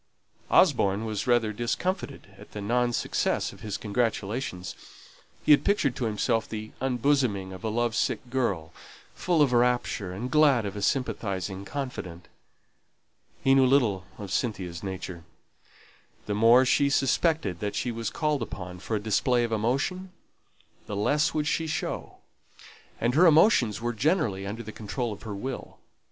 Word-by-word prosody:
Osborne 100 Hz, +3 st, +3 dB
was 105 Hz, -1 st, -3 dB
rather 120 Hz, -3 st, +2 dB
discomfited 120 Hz, -, -3 dB
at -, -, -15 dB
the 105 Hz, -, -5 dB
non 120 Hz, +4 st, +1 dB
success -, -, -1 dB
of -, -, -16 dB
his 105 Hz, -3 st, -4 dB
congratulations; 105 Hz, -2 st, -2 dB, 0.7 s
he -, -, +5 dB
had 145 Hz, -, +7 dB
pictured 150 Hz, -, +1 dB
to 125 Hz, -, -2 dB
himself 110 Hz, +1 st, 0 dB
the 110 Hz, 0 st, -6 dB
unbosoming 125 Hz, -7 st, +1 dB
of 95 Hz, -, -10 dB
a 110 Hz, -, -1 dB
love 120 Hz, +1 st, 0 dB
sick 125 Hz, -, -1 dB
girl, 100 Hz, -11 st, -1 dB, 0.4 s
full 170 Hz, -4 st, +2 dB
of 130 Hz, -3 st, +1 dB
rapture, 120 Hz, -5 st, +1 dB
and 115 Hz, +7 st, -5 dB
glad 140 Hz, -7 st, +4 dB
of 100 Hz, -, -4 dB
a 105 Hz, -, -5 dB
sympathizing 100 Hz, -5 st, -2 dB
confidant. 100 Hz, -, -6 dB, 1.1 s
He 135 Hz, 0 st, +5 dB
little 130 Hz, -8 st, +3 dB
knew 100 Hz, -, -7 dB
Cynthia's 95 Hz, -5 st, -3 dB
nature. 95 Hz, -3 st, -6 dB, 1.0 s
The 105 Hz, -, -2 dB
more 115 Hz, +5 st, +6 dB
she 140 Hz, +2 st, +3 dB
suspected 140 Hz, -, +1 dB
that 105 Hz, -1 st, -3 dB
she 125 Hz, -, -1 dB
was 115 Hz, -1 st, -3 dB
called 150 Hz, -4 st, -1 dB
upon 90 Hz, -5 st, -6 dB
for 110 Hz, +4 st, -3 dB
a -, -, 0 dB
display 120 Hz, +4 st, +1 dB
of 115 Hz, -, -2 dB
emotion, 135 Hz, -, -1 dB, 0.8 s
the 105 Hz, -, -4 dB
less 150 Hz, +11 st, +1 dB
would 150 Hz, -1 st, 0 dB
she 165 Hz, +1 st, 0 dB
show; 155 Hz, -, -4 dB, 0.8 s
and 120 Hz, +2 st, +1 dB
her 175 Hz, +6 st, +6 dB
emotions 155 Hz, -, +4 dB
were 120 Hz, 0 st, -1 dB
generally 115 Hz, -, 0 dB
under 110 Hz, +4 st, -5 dB
the 110 Hz, -, -8 dB
control 110 Hz, +2 st, -4 dB
of -, -, -12 dB
her 105 Hz, -3 st, -6 dB
will. 130 Hz, +6 st, -6 dB
115 Hz, 155 wpm, -27 LUFS, 100-135 Hz, 1.1 s, had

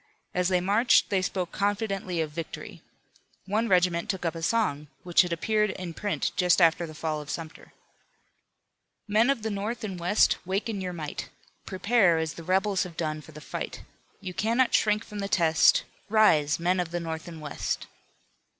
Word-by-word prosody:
As 180 Hz, 0 st, +1 dB
they 185 Hz, -1 st, +2 dB
marched 210 Hz, +6 st, +3 dB
they 195 Hz, -2 st, +2 dB
spoke 185 Hz, -1 st, -2 dB
confidently 195 Hz, -4 st, -1 dB
of 155 Hz, -2 st, -3 dB
victory. 165 Hz, +1 st, -7 dB, 0.6 s
One 215 Hz, +4 st, 0 dB
regiment 180 Hz, -2 st, +2 dB
took 190 Hz, -2 st, -2 dB
up 165 Hz, -, 0 dB
a 165 Hz, -, -7 dB
song 165 Hz, -7 st, 0 dB, 0.2 s
which 175 Hz, -1 st, +4 dB
had 180 Hz, -2 st, -2 dB
appeared 210 Hz, +5 st, +1 dB
in 180 Hz, -3 st, -6 dB
print 205 Hz, +4 st, -2 dB
just 180 Hz, -1 st, +3 dB
after 170 Hz, 0 st, +4 dB
the 155 Hz, -, -10 dB
fall 155 Hz, -1 st, -2 dB
of 145 Hz, -, -11 dB
Sumter: 160 Hz, -2 st, -7 dB, 1.4 s
"Men 215 Hz, +4 st, +3 dB
of 275 Hz, -6 st, 0 dB
the 220 Hz, -, -2 dB
North 210 Hz, +4 st, -3 dB
and 190 Hz, -4 st, -4 dB
West, 180 Hz, +5 st, +3 dB
Wake 190 Hz, +4 st, -2 dB
in 210 Hz, -4 st, -3 dB
your 180 Hz, -1 st, -3 dB
might. 155 Hz, -4 st, -6 dB, 0.4 s
Prepare 195 Hz, -2 st, +3 dB
as 160 Hz, -1 st, -2 dB
the 165 Hz, -, -10 dB
rebels 190 Hz, +2 st, +1 dB
have 175 Hz, -3 st, -5 dB
done 155 Hz, -2 st, -2 dB
For 160 Hz, -, -14 dB
the 155 Hz, 0 st, -11 dB
fight. -, -, -6 dB, 0.4 s
You 185 Hz, -2 st, -6 dB
cannot 235 Hz, +6 st, +1 dB
shrink 210 Hz, +1 st, +2 dB
from 210 Hz, -, -8 dB
the 200 Hz, 0 st, -3 dB
test; 165 Hz, -4 st, +4 dB, 0.3 s
Rise! 160 Hz, -10 st, +4 dB
Men 180 Hz, +2 st, +1 dB
of 175 Hz, -2 st, -1 dB
the 175 Hz, +1 st, -3 dB
North 160 Hz, -1 st, -5 dB
and 165 Hz, -2 st, -8 dB
West." 150 Hz, -2 st, -3 dB
180 Hz, 185 wpm, -27 LUFS, 165-205 Hz, 1.4 s, which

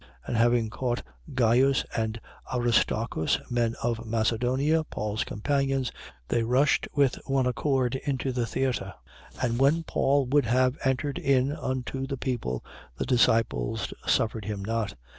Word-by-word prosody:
And -, -, -3 dB
having 115 Hz, -1 st, +3 dB
caught 120 Hz, +1 st, -2 dB, 0.3 s
Gaius 130 Hz, +3 st, +3 dB
and 110 Hz, 0 st, -1 dB, 0.3 s
Aristarchus, 115 Hz, -7 st, +1 dB
men 120 Hz, -1 st, +1 dB
of 115 Hz, -1 st, -1 dB
Macedonia, 120 Hz, +7 st, +1 dB
Paul's 105 Hz, -7 st, -3 dB
companions, 135 Hz, +3 st, -1 dB, 0.4 s
they 115 Hz, -, +1 dB
rushed 125 Hz, +3 st, +2 dB
with 140 Hz, -3 st, +2 dB
one 135 Hz, -2 st, +2 dB
accord 125 Hz, 0 st, +1 dB
into 135 Hz, -1 st, -2 dB
the 125 Hz, -2 st, -1 dB
theatre. 120 Hz, -8 st, -2 dB, 0.4 s
19:30. -, -, -6 dB
And 120 Hz, -1 st, 0 dB
when 145 Hz, +5 st, +3 dB
Paul 140 Hz, -3 st, +2 dB
would 135 Hz, -1 st, +2 dB
have 125 Hz, +2 st, +3 dB
entered 135 Hz, +2 st, 0 dB
in 135 Hz, 0 st, +2 dB
unto 130 Hz, -2 st, -3 dB
the 135 Hz, 0 st, -3 dB
people, 120 Hz, -, -3 dB, 0.3 s
the -, -, -2 dB
disciples 115 Hz, -, +1 dB
suffered 110 Hz, -2 st, +1 dB
him 100 Hz, -2 st, -4 dB
not. 110 Hz, -2 st, -2 dB
125 Hz, 140 wpm, -27 LUFS, 115-135 Hz, 0.4 s, having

